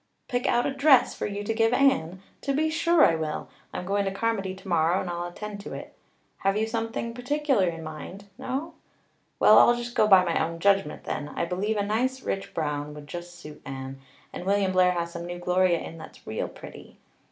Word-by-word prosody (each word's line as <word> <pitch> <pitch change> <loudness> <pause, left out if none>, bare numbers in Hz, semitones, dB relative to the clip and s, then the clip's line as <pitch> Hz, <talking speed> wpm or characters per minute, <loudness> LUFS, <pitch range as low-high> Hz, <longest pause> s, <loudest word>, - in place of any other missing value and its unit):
"Pick 245 -1 -1
out 240 - +2
a 275 - -1
dress 275 -1 +5
for - - -3
you 205 0 -4
to 225 +2 -1
give 225 +1 +2
Anne? 195 -10 +2 0.2
To 275 - -1
be 315 +2 +1
sure 335 0 +4
I - - +4
will. 160 -1 -3 0.2
I'm 180 - -5
going 200 +2 +1
to 195 - -1
Carmody 195 -2 -1
tomorrow 175 -2 +1
and - - -4
I'll 175 0 -3
attend 205 +3 -7
to 200 - -8
it. - - -9 0.5
Have 195 +1 +1
you 220 - +1
something 225 +1 -3
particular 255 -4 +1
in 165 -1 -4
mind? 160 +6 -8
No? 280 +9 -4 0.7
Well, - - +8
I'll 240 - +6
just 240 0 -5
go 215 - +3
by 190 -3 +7
my 170 -2 +1
own 165 +1 -3
judgment 195 -3 +1
then. 145 0 -4
I 170 - -2
believe 195 +5 -1
a 205 - +1
nice 255 +5 -1
rich 195 - -4
brown 150 -1 -2
would 150 -1 -10
just 175 +3 -8
suit 150 -3 -11
Anne, 135 0 -7 0.3
and - - -6
William 200 -1 +2
Blair 185 -1 +4
has 170 -1 -3
some 170 0 -6
new 175 0 -5
gloria 180 0 +2
in 165 0 -8
that's - - -13
real 110 - -3
pretty. - - -12
195 Hz, 210 wpm, -26 LUFS, 170-230 Hz, 0.7 s, Well